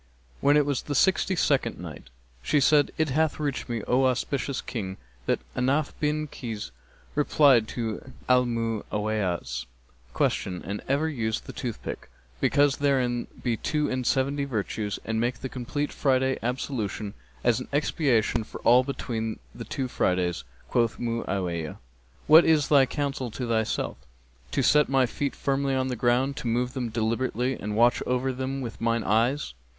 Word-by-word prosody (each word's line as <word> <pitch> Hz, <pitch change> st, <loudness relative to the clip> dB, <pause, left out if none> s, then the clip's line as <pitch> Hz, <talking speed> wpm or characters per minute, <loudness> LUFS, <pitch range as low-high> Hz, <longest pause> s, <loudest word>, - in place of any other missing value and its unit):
When 145 Hz, +1 st, +4 dB
it 145 Hz, -, +4 dB
was 140 Hz, -3 st, 0 dB
the 145 Hz, -, -4 dB
Sixty 190 Hz, +4 st, +3 dB
second 140 Hz, -8 st, +1 dB
Night, 85 Hz, -7 st, -9 dB, 0.3 s
She 145 Hz, -, +2 dB
said, 145 Hz, +1 st, +4 dB
It 155 Hz, -1 st, +1 dB
hath 155 Hz, +3 st, +1 dB
reached 145 Hz, -4 st, -2 dB
me, 115 Hz, -3 st, -2 dB
O 130 Hz, +2 st, +3 dB
auspicious 130 Hz, +1 st, -1 dB
King, 95 Hz, -5 st, -5 dB, 0.3 s
that -, -, +1 dB
Ahnaf 140 Hz, +4 st, +1 dB
bin 150 Hz, 0 st, 0 dB
Kays 115 Hz, -, -6 dB, 0.4 s
replied 140 Hz, -5 st, +4 dB
to 115 Hz, +2 st, -4 dB, 0.2 s
Al 125 Hz, -1 st, +4 dB
Mu'awiyah's[FN#269] 105 Hz, -, -2 dB, 0.5 s
question, 90 Hz, -1 st, 0 dB
'And 100 Hz, +2 st, -4 dB
ever 140 Hz, +4 st, +1 dB
use 115 Hz, -7 st, -1 dB
the -, -, -10 dB
toothstick, 120 Hz, -4 st, -5 dB, 0.3 s
because 145 Hz, -, +3 dB
therein 130 Hz, -4 st, +1 dB, 0.2 s
be 120 Hz, -2 st, 0 dB
two 150 Hz, +3 st, -1 dB
end 130 Hz, -1 st, -1 dB
seventy 140 Hz, +1 st, +1 dB
virtues 110 Hz, -5 st, -2 dB
and 110 Hz, 0 st, -1 dB
make 120 Hz, +2 st, 0 dB
the 130 Hz, -, -4 dB
complete 140 Hz, +4 st, -3 dB
Friday 130 Hz, -1 st, +1 dB
ablution 115 Hz, -4 st, -3 dB, 0.3 s
as 120 Hz, 0 st, +3 dB
an 125 Hz, -, -7 dB
expiation 140 Hz, -6 st, +1 dB
for -, -, -9 dB
all 125 Hz, +2 st, +6 dB
between 115 Hz, -5 st, -3 dB, 0.2 s
the -, -, -8 dB
two 130 Hz, -, -3 dB
Fridays.' 90 Hz, -, 0 dB, 0.2 s
Quoth 115 Hz, -2 st, +1 dB
Mu'awiyah, 95 Hz, -9 st, -2 dB, 0.5 s
'What 160 Hz, +2 st, +8 dB
is 155 Hz, -3 st, +3 dB
thy 140 Hz, -3 st, +6 dB
counsel 135 Hz, -2 st, -2 dB
to 120 Hz, +2 st, -4 dB
thyself?' 110 Hz, -1 st, -1 dB, 0.5 s
'To -, -, 0 dB
set 150 Hz, 0 st, +4 dB
my 135 Hz, -1 st, +4 dB
feet 140 Hz, +3 st, -3 dB
firmly 140 Hz, 0 st, 0 dB
on 130 Hz, 0 st, 0 dB
the 125 Hz, -, -2 dB
ground, 125 Hz, +4 st, +1 dB
to 125 Hz, -, -4 dB
move 125 Hz, +2 st, 0 dB
them 125 Hz, -3 st, -2 dB
deliberately 115 Hz, +3 st, 0 dB
and 105 Hz, +1 st, -3 dB
watch 120 Hz, +1 st, +4 dB
over 125 Hz, +1 st, 0 dB
them 130 Hz, +1 st, -3 dB
with 115 Hz, -4 st, -6 dB
mine 115 Hz, -1 st, +1 dB
eyes!' 115 Hz, -, +1 dB
125 Hz, 160 wpm, -27 LUFS, 110-140 Hz, 0.5 s, What